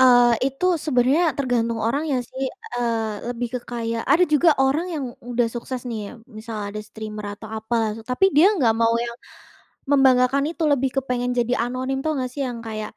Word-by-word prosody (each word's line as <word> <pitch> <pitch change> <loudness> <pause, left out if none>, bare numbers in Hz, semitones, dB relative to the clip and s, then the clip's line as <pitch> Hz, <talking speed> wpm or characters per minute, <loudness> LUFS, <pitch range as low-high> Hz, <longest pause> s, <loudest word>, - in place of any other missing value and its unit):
eee, 245 -2 +7
itu 275 +6 -3 0.2
sebenarnya 275 +3 +3
tergantung 235 -4 0
orangnya 280 +4 0
sih, 265 +1 -6 0.3
eee, 225 -3 -1
lebih 245 0 -3
ke - - 0
kayak 230 -1 -2
ada 355 +4 +6
juga 305 +2 +4
orang 270 +6 +2
yang 290 -3 -3 0.3
udah 240 -1 +2
sukses 250 +1 -4
nih 230 -2 -3
ya, - - -11
misal 220 -1 -8
ada 210 +1 -5
streamer 215 0 -8
atau 220 - -9
apalah, 220 0 0
tapi 250 +10 0
dia 330 +8 +7
enggak 245 - +3
mau 230 0 +2
yang 235 0 -3 0.7
membanggakan 270 -1 +4
itu, 335 0 -4
lebih 275 -3 +2
kepengen 250 -2 -1
jadi 240 0 +1 0.2
anonim. 260 +2 -2
Tahu 315 +2 0
enggak 255 -1 -2
sih 285 - -4
yang 245 -3 -3
kayak 215 -1 -4
245 Hz, 180 wpm, -23 LUFS, 230-270 Hz, 0.7 s, eee